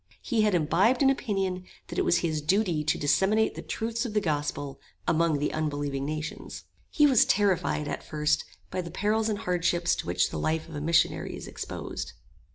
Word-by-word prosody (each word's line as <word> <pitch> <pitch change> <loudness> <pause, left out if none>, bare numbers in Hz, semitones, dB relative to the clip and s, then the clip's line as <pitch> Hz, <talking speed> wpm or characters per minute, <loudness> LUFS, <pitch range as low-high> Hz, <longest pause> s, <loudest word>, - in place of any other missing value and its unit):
He 235 -5 +1
had 210 -3 +3
imbibed 185 - +3
an 270 - +6
opinion 195 -8 -2 0.3
that - - -3
it - - +1
was 175 - +4
his 155 -2 -1
duty 175 -1 +1
to 155 - +1
disseminate 190 +10 +2
the - - -7
truths 230 +1 -3
of 225 -4 -5
the - - +5
gospel 145 -5 -2 0.3
among 165 -1 +2
the 145 +1 -1
unbelieving 145 -3 -2
nations. 155 +1 -5 0.3
He 295 - +4
was 265 -6 +6
terrified 190 -6 +1
at - - -3
first 155 0 0 0.3
by 185 - -1
the 170 - -7
perils 215 +5 0
and 210 - -1
hardships 175 -2 +1
to - - -5
which 90 +1 +1
the 80 - -3
life 160 - -1
of 165 - -11
a 145 - -4
missionary 165 +2 +1
is - - -8
exposed. - - -6
170 Hz, 190 wpm, -28 LUFS, 150-210 Hz, 0.3 s, an